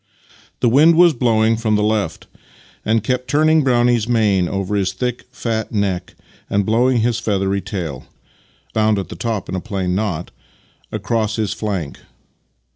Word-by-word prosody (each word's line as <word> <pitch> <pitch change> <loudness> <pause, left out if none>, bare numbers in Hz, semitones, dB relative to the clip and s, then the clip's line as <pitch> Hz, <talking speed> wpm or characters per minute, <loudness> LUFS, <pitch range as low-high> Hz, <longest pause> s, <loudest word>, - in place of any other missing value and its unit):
The - - +3
wind 150 +8 +5
was 175 -1 +6
blowing 115 -3 +2
from 110 -2 0
the 105 - +1
left, 105 -1 -1 0.6
and 110 0 +1
kept 125 +1 -1
turning 155 +1 +3
Brownie's 120 -3 +2
mane 105 -6 +2
over 100 +1 -2
his 95 -2 0
thick, 125 +5 -3
fat 115 -3 -3
neck 100 -5 -2 0.3
and 100 0 +1
blowing 120 +3 +2
his 115 0 +1
feathery 100 -2 0
tail, 90 - -5 0.3
— - - -35
bound 110 -1 +2
at 95 - -4
the - - -7
top 110 -5 -3
in - - -6
a 95 - -1
plain 95 -5 -2
knot, 90 -4 -2 0.3
— - - -36
across 110 -2 -1
his 110 -3 -1
flank. 95 -10 -4
110 Hz, 165 wpm, -19 LUFS, 100-120 Hz, 0.6 s, was